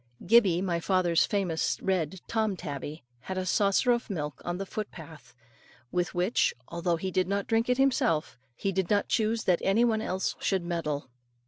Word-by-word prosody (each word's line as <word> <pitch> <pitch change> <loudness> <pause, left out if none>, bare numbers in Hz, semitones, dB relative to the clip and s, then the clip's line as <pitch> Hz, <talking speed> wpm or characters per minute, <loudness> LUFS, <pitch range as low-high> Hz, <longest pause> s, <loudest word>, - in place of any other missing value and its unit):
Gibbey, 190 -4 +5
my 175 -3 0
father's 175 -1 +2
famous 185 -6 0
red 185 -2 -1
Tom 220 -4 0
tabby, 150 -1 -6 0.2
had 190 +9 -6
a 185 - -1
saucer 200 +6 +3
of 240 0 0
milk 150 -6 -4
on 175 0 -3
the 195 - -4
foot 210 +2 -5
path, 160 -5 -13 0.6
with 180 0 -1
which, 180 +7 +2
although 170 0 0
he 185 +3 -3
did 185 0 +1
not 200 +1 -1
drink 225 +2 +1
it 250 - +3
himself, 210 - +1 0.2
he 195 - -1
did 190 -2 -1
not 205 -1 +2
choose 220 0 +1
that 180 -2 +2
any 215 +5 +3
one 220 -2 +1
else 190 -3 -2
should 190 -3 0
meddle. 150 -6 -3
185 Hz, 185 wpm, -28 LUFS, 170-210 Hz, 0.6 s, Gibbey